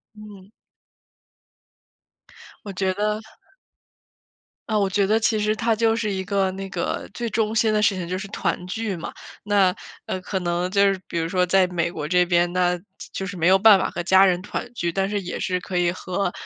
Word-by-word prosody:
嗯。 205 -2 -13 2.2
我 200 - -5
觉 190 +1 0
得 210 +2 -1 1.5
呃， 215 -2 +1
我 200 -1 +1
觉 195 0 +1
得 215 +2 +3
其 220 0 +1
实 210 +1 +1
它 230 0 +1
就 225 0 +2
是 215 -2 -1
一 190 -1 -2
个， 195 -1 0
那 195 +1 -6
个 175 -2 -3
最 235 -1 -3
中 220 -1 0
心 220 -1 +3
的 210 - +2
事 205 -1 +3
情， 180 -2 -4
就 185 +2 -2
是 195 +1 -6
团 180 - -2
聚 215 +1 -3
嘛。 165 - -6 0.3
那， 200 -3 +3 0.3
呃， 185 - -3
可 190 +1 -3
能 175 0 -1
就 200 +1 +2
是 190 - -6
比 - - -4
如 165 0 0
说 180 +1 +1
在 185 +1 +4
美 170 -1 -1
国 150 -3 -5
这 180 +2 +3
边， 175 0 +2
那 180 -1 +1 0.3
就 190 - -4
是 190 0 -6
没 170 0 +1
有 190 - +6
办 205 0 +7
法 - - -1
和 175 - -4
家 190 +2 +6
人 180 -2 +2
团 240 +4 -5
聚。 175 -7 -2
但 195 +3 -1
是 205 - -1
也 180 - -5
是 180 -1 -1
可 180 0 -4
以 175 -1 +2
和 185 +1 -2
190 Hz, 220 characters per minute, -23 LUFS, 180-210 Hz, 2.2 s, 办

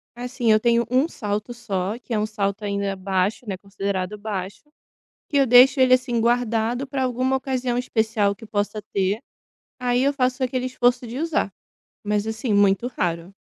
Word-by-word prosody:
assim, 245 -1 -1
eu 215 - +5
tenho 235 +1 +2
1 260 +5 +3
salto 210 -3 -4
só, 210 -3 -3
que 245 - -7
é 215 - +1
um 210 - +1
salto 210 -1 -2
ainda 200 -1 -1
baixo, 190 +4 -1
né, 195 - -2
considerado 195 0 -4
baixo, 200 -2 -5 0.7
que 290 - -2
eu 275 - +5
deixo 255 +3 +7
ele, 255 -1 +6
assim, 245 -2 0
guardado 235 +2 +1
para 265 -1 -2
alguma 255 +1 0
ocasião 255 -2 -2
especial 220 -4 +1
que 225 +2 -13
possa 210 0 -2
ter, 195 +2 +1 0.6
aí 245 0 +1
eu 280 - +3
faço 255 -1 0
aquele 255 0 -1
esforço 245 -1 +1
de 235 +4 -6
usar, 320 -10 0 0.5
mas 210 0 0
assim, 220 0 -2
muito 200 +3 +3
raro. 175 -5 -3
230 Hz, 175 wpm, -23 LUFS, 200-250 Hz, 0.7 s, deixo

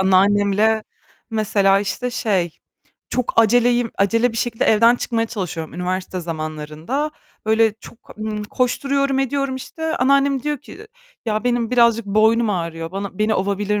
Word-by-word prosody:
anneannemle 205 +3 +3 0.5
mesela, 200 -3 +2
işte, 250 +5 -3
şey, 190 -9 -1 0.5
çok 250 -2 -1
aceleyim 240 +1 +4
acele 230 +4 +2
bir - - -7
şekilde 230 0 -1
evden 230 +3 +5
çıkmaya 230 -1 -1
çalışıyorum 175 -8 -5
üniversite 185 +1 -3
zamanlarında. 155 - -4 0.4
Böyle, 220 0 +3
çok, 235 - -15
ımm, 215 -1 -3
koşturuyorum 275 +4 0
ediyorum, 270 0 -1
işte, 320 +4 -4
anneannem 275 +1 +2
diyor 295 0 -2
ki 420 +9 -13 0.4
"Ya, 215 +1 -1
benim 240 -2 0
birazcık 235 -3 +3
boynum 220 +2 +3
ağrıyor, 165 -3 -3
bana 195 -1 -5
beni 215 +1 +2
ovabilir 200 +1 0
220 Hz, 135 wpm, -20 LUFS, 195-245 Hz, 0.5 s, evden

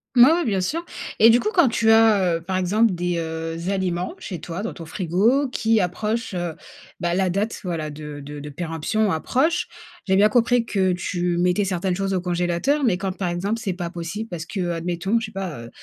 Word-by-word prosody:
Oui 240 - +9
oui, 345 0 +1
bien 195 -5 +1
sûr. 325 - -2 0.3
Et 225 - +8
du 235 +2 +5
coup 425 - 0
quand 345 -7 +5
tu 225 -1 +3
as, 210 -6 +5
heu, - - -10
par 185 +3 -3
exemple, 200 +4 +2
des, 175 0 -1
heu, 165 0 -4
aliments 185 -2 -1
chez 180 - -6
toi 170 +4 -5
dans 225 - -4
ton 165 - -9
frigo 205 - +1
qui 225 -3 +2
approchent, 215 +5 -2
heu, 175 -2 -3 0.5
bah, 170 0 0
la 190 +1 +1
date, 205 +5 -1
voilà 165 -4 -2
de 150 -1 -8
de 145 +1 -8
de 150 +1 -7
péremption 170 +7 -1
approche, 295 - +1 0.4
j'ai 190 - +3
bien 205 +2 +5
compris 240 +1 +3
que 190 -4 +1
tu 175 0 -1
mettais 180 +3 +2
certaines 185 -1 -1
choses 195 0 -1
au 185 - 0
congélateur, 180 +11 0
mais 190 -7 +2
quand, 190 0 -2
par 185 - -2
exemple, 195 +6 -1
c'est 200 -5 -2
pas 175 -1 -4
possible 175 +6 -5
parce 165 -2 -5
que, 180 0 -3
admettons, 175 +5 -1
je 230 - -4
sais - - -12
pas, 190 - -5
heu, 115 - -10
185 Hz, 215 wpm, -23 LUFS, 175-220 Hz, 0.5 s, Oui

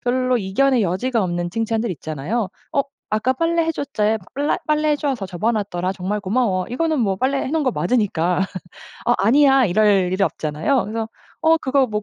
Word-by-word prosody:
별로 255 0 +1
이견의 240 +6 +2
여지가 210 +6 0
없는 175 -1 -2
칭찬들 225 +1 -1
있잖아요. 165 - -3 0.2
어 280 - +2 0.3
"아까 220 +4 +1
빨래해 330 +3 +1
줬잖아 220 -8 0 0.2
빨래 290 +2 0
빨래해줘서 300 -7 0
접어 185 +5 -1
놨더라. 190 -4 -2
정말 195 +2 -3
고마워." 195 -2 0
이거는 315 +3 0
뭐 195 -4 +1
빨래해 265 +5 0
놓은 320 0 +1
거 260 - +2
맞으니까 185 -9 +1 0.7
"어 - - +4
아니야." 270 +6 +5
이럴 195 -2 +3
일이 190 - 0
없잖아요. 160 - 0
그래서 220 +2 -4 0.3
어 320 0 +4
그거 270 -2 +1
뭐 210 -2 -3
225 Hz, 380 characters per minute, -21 LUFS, 190-270 Hz, 0.7 s, 아니야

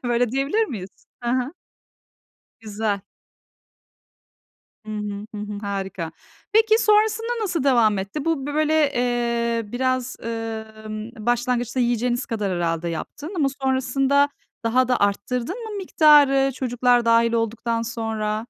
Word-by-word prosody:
Öyle 240 -1 +1
diyebilir 275 - +1
miyiz? 200 - -6 0.3
Hı 240 - -1
hı. 255 +3 0 1.1
Güzel. 210 -2 -2 1.9
Hı 215 - -5
hı, 210 -1 -4
hı - - -5
hı. 210 0 -5
Harika. 195 -5 -4 0.4
Peki, 440 0 +5
sonrasında 440 +2 +2
nasıl 350 -8 -1
devam 230 -7 +4
etti? 200 +10 -4
Bu, 320 -5 0
b 290 - -4
böyle, 310 -1 +3
eee, 235 -2 0
biraz, 255 0 -1
ımm, 220 -1 -6
başlangıçta 245 +2 0
yiyeceğiniz 240 +1 0
kadar 210 -5 -2
herhâlde 170 -1 -1
yaptın 290 - -6
ama 290 -5 +2
sonrasında 270 +2 +2 0.4
daha 250 +2 +3
da 250 - +1
arttırdın 235 - -1
mı 435 -2 -6
miktarı, 290 -7 +5
çocuklar 245 -1 +2
dâhil 230 0 +4
olduktan 230 0 -1
sonra? 225 -1 -3
240 Hz, 125 wpm, -23 LUFS, 215-275 Hz, 1.9 s, Peki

